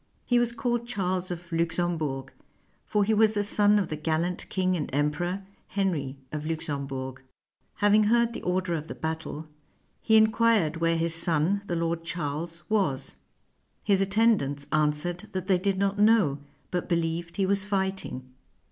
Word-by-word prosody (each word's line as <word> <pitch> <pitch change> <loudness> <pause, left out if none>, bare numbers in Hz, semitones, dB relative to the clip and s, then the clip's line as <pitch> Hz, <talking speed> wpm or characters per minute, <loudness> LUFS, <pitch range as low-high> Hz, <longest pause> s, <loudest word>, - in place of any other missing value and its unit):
He 245 -1 +3
was 240 -1 +1
called 240 0 -2
Charles 185 -5 -1
of 175 0 -7
Luxembourg; 165 -5 -1 0.5
for 210 -1 +2
he 220 +2 +2
was 220 0 +4
the 205 - +1
son 205 0 +3
of 195 -5 0
the 155 - -2
gallant 160 +3 -2
king 185 -1 +1
and 155 -4 -3
Emperor, 160 +7 -1 0.2
Henry 165 -9 -1
of 150 -1 -4
Luxembourg: 140 -5 -4 0.5
hav 205 0 +3
ing 215 0 +5
heard 235 +2 +3
the - - -6
order 180 -1 0
of 155 -1 -3
the - - -6
battle, 160 -1 -4 0.5
he 220 -1 +4
inquired 220 -7 +3
where 165 0 +1
his 165 0 0
son, 165 +3 +1
the 175 - -1
Lord 165 0 -1
Charles, 165 +1 -4
was: 190 -12 0 0.7
his 195 -2 +3
attendants 195 -9 +2
answered 155 +3 0
that 185 -1 -3
they 185 -1 +3
did 195 0 0
not 200 +1 0
know, 205 -10 +4 0.3
but 180 +1 -2
believed 170 0 -1
he 195 - +2
was 195 0 +1
fighting. 190 -9 -2
175 Hz, 160 wpm, -27 LUFS, 160-205 Hz, 0.7 s, ing